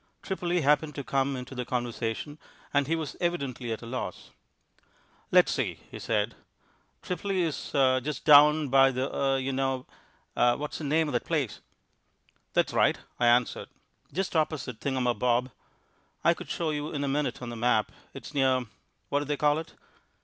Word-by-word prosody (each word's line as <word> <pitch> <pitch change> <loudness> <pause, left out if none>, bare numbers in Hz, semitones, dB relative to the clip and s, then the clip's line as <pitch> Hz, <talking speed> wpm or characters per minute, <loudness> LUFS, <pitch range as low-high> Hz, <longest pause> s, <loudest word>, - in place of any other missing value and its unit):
Tripoli 180 -3 -1
happened 150 +1 +2
to 140 - -4
come 135 +1 0
into 125 +1 -7
the 125 -1 -3
conversation, 120 +3 -3 0.3
and 140 -1 +2
he 165 - +1
was 160 -2 -4
evidently 140 -9 -2
at 110 - -4
a - - -7
loss. 125 +2 -5 1.0
"Let's - - +5
see," - - -1 0.2
he - - -7
said. - - 0 0.7
"Tripoli 185 0 -1
is 160 -3 -3
just 135 +1 +1
down 150 0 +7
by 135 +1 +6
the 130 +1 -2
er 135 -1 +2
you 135 0 -2
know. 130 -1 -1 0.5
What's 120 +5 +1
the 155 - -5
name 155 +2 +2
of 145 - -4
that 120 - -1
place?" 150 -9 -1 0.9
"That's - - +2
right," - - +3 0.2
I 120 - +3
answered, 120 0 +2 0.4
"just 185 +3 -2
opposite 150 -7 -1
Thingumabob. 125 -1 0 0.7
I - - +5
could - - -10
show 165 -2 -1
you 150 0 -3
in 145 -2 -2
a - - -1
minute 145 +1 -1
on 125 - -6
the - - -6
map. 110 -2 +1 0.2
It's - - -9
near 130 -3 +2 0.4
what 145 - +2
do 145 - -3
they 145 0 -1
call 150 +1 +3
it?" 165 - -9
135 Hz, 170 wpm, -28 LUFS, 125-150 Hz, 1.0 s, down